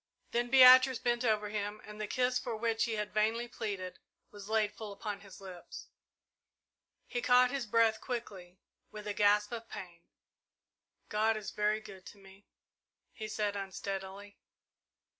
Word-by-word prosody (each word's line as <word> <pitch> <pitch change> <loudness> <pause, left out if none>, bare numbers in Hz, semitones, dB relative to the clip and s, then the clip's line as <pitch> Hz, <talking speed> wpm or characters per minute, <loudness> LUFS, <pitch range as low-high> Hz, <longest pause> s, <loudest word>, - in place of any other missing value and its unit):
Then 240 +1 0
Beatrice 255 0 +8
bent 240 0 0
over 215 -3 +1
him, 210 0 -3
and 210 0 -9
the 210 - -3
kiss 250 +1 +1
for 235 - -4
which 225 +1 0
he 230 - -3
had 210 -1 -3
vainly 220 +3 +1
pleaded 200 -6 -5 0.3
was 205 0 -11
laid 215 -1 +1
full 215 -1 -8
upon 200 0 -5
his 200 -3 -13
lips. 185 -3 -10 1.2
He 245 - -3
caught 250 0 +5
his 270 -5 -3
breath 225 0 +3
quickly, 195 -7 -6 0.3
with 210 0 -9
a 205 - -2
gasp 205 +1 +3
of 230 -1 -6
pain. 175 -2 -9 1.1
"God 220 +1 +1
is 215 - -6
very 210 +1 0
good 190 -3 -12
to - - -12
me," 195 0 -18 0.7
he 215 - -6
said 210 -1 -2
unsteadily. 195 +1 -6
215 Hz, 155 wpm, -32 LUFS, 200-235 Hz, 1.2 s, Beatrice